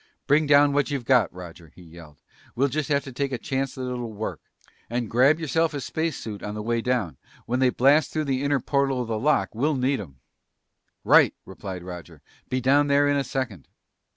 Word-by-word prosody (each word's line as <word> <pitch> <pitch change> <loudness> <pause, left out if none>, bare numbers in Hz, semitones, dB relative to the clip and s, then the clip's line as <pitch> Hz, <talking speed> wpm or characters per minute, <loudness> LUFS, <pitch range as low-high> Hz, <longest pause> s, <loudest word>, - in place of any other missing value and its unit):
"Bring 150 +2 +3
down 145 0 +5
what 145 +1 +1
you've 140 -4 -3
got, 125 -5 +3
Roger!" 90 -2 -11
he 90 - -17
yelled. 80 -3 -15 0.3
"We'll 140 +3 +2
just 150 +2 -2
have 140 -2 +1
to 135 - -9
take 140 +2 -2
a 130 - -2
chance 135 +2 -3
that 130 - -5
it'll 120 -2 -4
work. 110 +1 -5 0.5
And 120 0 -2
grab 135 +7 +4
yourself 160 0 0
a - - -2
space 160 +4 -3
suit 105 -3 -7
on 105 0 -5
the 105 - -5
way 115 +1 0
down. 120 -9 -1 0.3
When 125 +2 -1
they 130 -1 +4
blast 140 +5 +3
through 155 -1 -2
the 135 -2 -1
inner 140 -1 +1
portal 135 -1 0
of - - -8
the 110 -1 -2
lock, 115 - +2
we'll 145 +7 0
need 130 0 0
'em!" 70 -9 -12 0.8
"Right!" - - +5
replied 95 -3 -8
Roger. 90 -1 -10 0.3
"Be 130 - 0
down 140 +3 +3
there 140 0 +3
in 145 - +2
a 140 - +1
second." 125 - -4
130 Hz, 210 wpm, -25 LUFS, 110-140 Hz, 0.8 s, down